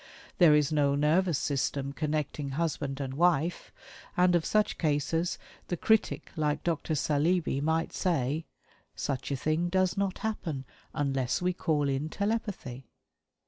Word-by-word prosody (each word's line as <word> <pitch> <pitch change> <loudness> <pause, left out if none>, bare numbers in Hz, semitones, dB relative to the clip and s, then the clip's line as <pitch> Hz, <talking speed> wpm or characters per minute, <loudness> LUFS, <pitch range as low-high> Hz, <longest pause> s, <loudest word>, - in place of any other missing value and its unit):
There 165 -4 +7
is 150 0 +2
no 145 -2 +2
nervous 155 +3 +2
system 140 -1 -1
connecting 150 -1 -2
husband 145 -4 -2
and 135 -2 -3
wife, 170 +1 +1 0.5
and 180 0 +5
of 170 -2 +2
such 215 -1 +1
cases 160 +2 0 0.3
the 175 - -2
critic 220 +5 +1
like 150 -2 0
Dr. 160 -1 -1
Saleeby 150 +1 +1
might 160 +2 0
say: 155 -3 0 0.5
"Such 135 -2 -3
a 140 - 0
thing 155 +5 0
does 185 +1 +1
not 195 -2 0
happen 165 -11 -3 0.3
UNLESS 135 0 0
WE 180 0 +2
CALL 155 -5 0
IN 140 +3 -1
TELEPATHY!" 200 - -3
155 Hz, 140 wpm, -29 LUFS, 140-175 Hz, 0.5 s, There